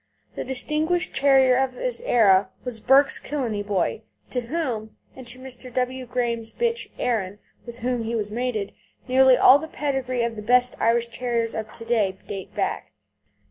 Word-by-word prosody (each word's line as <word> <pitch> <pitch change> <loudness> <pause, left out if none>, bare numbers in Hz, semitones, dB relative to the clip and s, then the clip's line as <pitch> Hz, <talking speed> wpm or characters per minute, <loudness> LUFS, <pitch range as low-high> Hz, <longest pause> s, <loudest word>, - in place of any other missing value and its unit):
The - - -4
distinguished 310 +7 0
terrier 270 -2 +5
of 265 -1 0
his - - -2
era 195 -5 +4
was 245 -3 -5
Burke's 270 +5 +4
Killeney 240 -8 -3
Boy, 205 0 -1 0.3
to 250 - -1
whom, 235 -5 -4 0.2
and 260 -2 -11
to 240 +2 -4
Mr. 255 -1 -9
W. 255 +1 -2
Graham's 235 -2 -2
bitch 470 0 -1
Erin, 205 -6 -1 0.3
with 235 0 -8
whom 245 0 -1
he 230 +1 -3
was 210 -2 -3
mated, 225 -3 -2 0.3
nearly 260 0 +5
all 275 - +7
the 315 - -6
pedigrees 265 -5 -2
of 230 -1 -4
the - - -5
best 250 +3 +3
Irish 235 +1 +2
Terriers 235 -1 -2
of 220 -1 -5
to 230 - -9
day 210 -5 +1
date 195 -2 -7
back. - - -3
245 Hz, 170 wpm, -24 LUFS, 225-265 Hz, 0.3 s, all